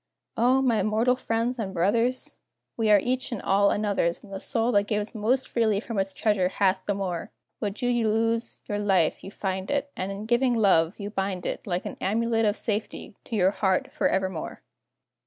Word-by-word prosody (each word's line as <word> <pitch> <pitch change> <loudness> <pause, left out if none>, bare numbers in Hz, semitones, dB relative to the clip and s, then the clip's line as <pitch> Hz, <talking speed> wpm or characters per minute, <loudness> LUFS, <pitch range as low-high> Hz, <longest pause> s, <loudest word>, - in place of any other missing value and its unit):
O, 255 +3 +3
my 235 -4 +2
mortal 225 +4 +2
friends 235 0 -1
and 195 -3 -4
brothers! 230 +8 +1 0.4
We 225 -2 0
are 210 - +8
each 255 +4 -2
and 235 - -3
all 200 +1 +3
another's, 200 -5 0
And 200 -2 -12
the 195 - -4
soul 230 +4 0
that 205 -2 +2
gives 210 +1 -2
most 240 +4 +1
freely 220 -4 +1
from 220 -1 -4
its 195 0 -1
treasure 195 -2 +1
hath 190 -1 +1
the 205 - +1
more; 180 -4 -3 0.3
Would 210 +4 -4
you 240 -2 +2
lose 225 +2 0
your 205 0 -2
life, 190 -6 +1
you - - -7
find 190 -1 -4
it, 285 0 -1
And 190 +1 -3
in 200 +2 -6
giving 240 +2 +2
love, 190 -5 +3
you 205 0 -5
bind 195 -3 -2
it - - -4
Like 180 0 -2
an - - -6
amulet 225 +2 +1
of 210 0 +1
safety, 210 -1 -3
to 230 - -4
your 190 -2 +3
heart 190 -2 0
forevermore. 190 -3 -1
210 Hz, 195 wpm, -26 LUFS, 195-230 Hz, 0.4 s, are